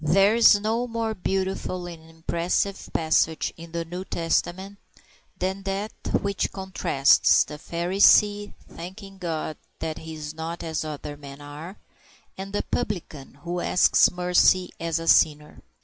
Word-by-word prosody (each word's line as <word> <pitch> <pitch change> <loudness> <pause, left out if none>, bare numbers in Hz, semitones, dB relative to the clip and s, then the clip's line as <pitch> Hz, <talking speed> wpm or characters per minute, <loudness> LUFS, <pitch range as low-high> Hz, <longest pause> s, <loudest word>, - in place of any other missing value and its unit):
THERE 195 +7 +4
is 230 -3 +6
no 225 +4 -1
more 230 -1 -2
beautiful 190 -2 -2
and 165 -2 -10
impressive 170 +4 -2
passage 160 0 +1
in 165 0 -11
the 170 0 -3
New 180 +3 -6
Testament 190 +3 -2 0.6
than 190 +1 -2
that 195 +2 -3 0.3
which 200 -1 -2
contrasts 190 -7 +3
the 150 - -9
Pharisee 200 +5 +3 0.2
thanking 195 +3 -10
God 160 -3 -3 0.2
that 160 -1 -4
he 160 0 -8
is 150 -1 -6
not 160 +2 -6
as 160 -1 -2
other 150 -1 -6
men 140 -1 -11
are 150 +6 -9 0.6
and 195 +1 -7
the 205 - -1
Publican 170 - -4
who 175 +1 -3
asks 180 - +4
mercy 180 +1 +3
as 165 -1 -1
a 165 0 -5
sinner. 150 -2 +3
175 Hz, 140 wpm, -25 LUFS, 160-195 Hz, 0.6 s, is